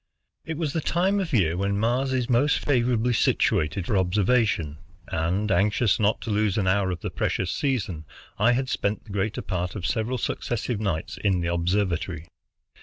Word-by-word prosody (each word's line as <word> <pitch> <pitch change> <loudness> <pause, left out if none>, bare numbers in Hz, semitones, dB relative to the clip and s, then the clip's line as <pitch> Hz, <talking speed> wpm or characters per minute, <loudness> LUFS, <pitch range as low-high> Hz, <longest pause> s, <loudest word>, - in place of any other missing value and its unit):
It 160 -1 -4
was 155 -3 -2
the 160 - 0
time 190 +6 +1
of 185 -4 -2
the 135 - +2
year 80 -1 0
when 100 +2 0
Mars 125 +5 +1
is 125 -2 0
most 130 +4 +3
favorably 125 -3 +1
situated 85 -4 +1
for 100 -2 +1
observation, 95 -5 +1 0.3
and, 90 +6 -1
anxious 100 +1 +2
not 105 0 +1
to 115 - -4
lose 105 -1 +1
an 100 - +1
hour 95 0 +2
of 90 -2 -4
the - - -4
precious 95 -1 -1
season, 105 - -2 0.3
I 115 +4 +4
had 130 +2 0
spent 105 -3 -1
the 110 - -13
greater 100 +2 -2
part 90 0 -3
of 95 -4 -4
several 120 +2 -1
successive 120 -2 -2
nights 90 -7 -2
in 95 -3 +2
the 85 0 -1
observatory. 85 -2 -1
105 Hz, 180 wpm, -25 LUFS, 90-125 Hz, 0.3 s, I